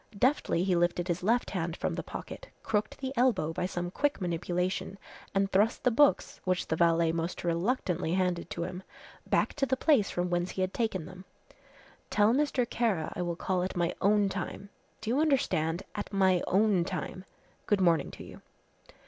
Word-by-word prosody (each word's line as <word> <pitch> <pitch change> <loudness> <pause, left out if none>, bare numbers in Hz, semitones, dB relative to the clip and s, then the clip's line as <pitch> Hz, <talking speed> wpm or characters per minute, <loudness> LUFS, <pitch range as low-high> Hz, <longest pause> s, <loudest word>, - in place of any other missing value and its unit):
Deftly 245 - +2
he 185 -1 +2
lifted 175 +1 +1
his 175 -1 -1
left 230 +6 +1
hand 170 -3 -2
from - - -2
the - - -3
pocket, - - -8 0.2
crooked 215 0 -1
the 265 -1 -4
elbow 230 -11 +2
by 180 - -1
some 175 -1 -4
quick 290 +7 0
manipulation, 180 +2 -2 0.4
and 195 0 +2
thrust 210 +5 +2
the 250 - +4
books, 285 +5 +3
which 185 -1 0
the 160 - -1
valet 165 0 +3
most 165 +1 -3
reluctantly 175 -1 0
handed 180 -2 0
to 170 - -3
him, 180 +1 -5 0.5
back - - +1
to 295 - -4
the 260 +1 +1
place 260 -9 +3
from 175 0 -2
whence 175 +1 0
he 190 - -4
had 185 0 -1
taken 205 -8 -1
them. 185 0 -11 0.9
"Tell 210 +2 +4
Mr. 270 -3 +1
Kara 215 -10 -1
I - - -3
will 175 -1 -2
call 180 +1 -1
at 185 0 -3
my 175 0 +1
own 205 0 +4
time 195 +1 -5 0.3
do 220 +1 -2
you 260 - +2
understand, 190 - +1
at 205 - -5
my 190 -3 +3
own 200 -2 +3
time. 185 0 -5 0.4
Good 205 - +3
morning 170 -5 +3
to - - -10
you." - - -12
185 Hz, 185 wpm, -30 LUFS, 175-215 Hz, 0.9 s, the